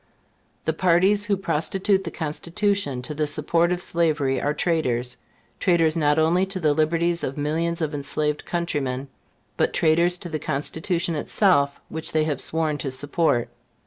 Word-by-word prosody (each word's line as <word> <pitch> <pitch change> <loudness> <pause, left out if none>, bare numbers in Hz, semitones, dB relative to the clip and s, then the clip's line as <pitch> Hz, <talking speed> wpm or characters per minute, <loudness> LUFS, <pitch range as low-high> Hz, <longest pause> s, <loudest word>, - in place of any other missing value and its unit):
The - - +1
parties 190 +3 +3
who 205 -2 +1
prostitute 190 +3 0
the - - -2
Constitution 165 -2 -2
to 135 - -4
the 150 0 -1
support 165 +4 +1
of 180 0 -1
slavery 155 -5 +1
are 145 - +1
traitors 130 -7 0 0.4
traitors 165 -4 +3
not 150 -2 +2
only 165 +4 +3
to 190 -1 -3
the 155 -4 +2
liberties 170 +3 +1
of 135 - -3
millions 165 +4 -1
of 155 -1 -2
enslaved 150 +1 -1
countrymen, 140 -6 -3 0.5
but - - +1
traitors 170 +2 +3
to 175 - -8
the 155 -1 -3
Constitution 165 +5 -1
itself 150 -3 +2
which 160 0 -3
they 155 -1 +3
have 150 -4 -1
sworn 155 -2 -1
to 140 - -2
support. 140 -1 0
160 Hz, 155 wpm, -24 LUFS, 145-175 Hz, 0.5 s, parties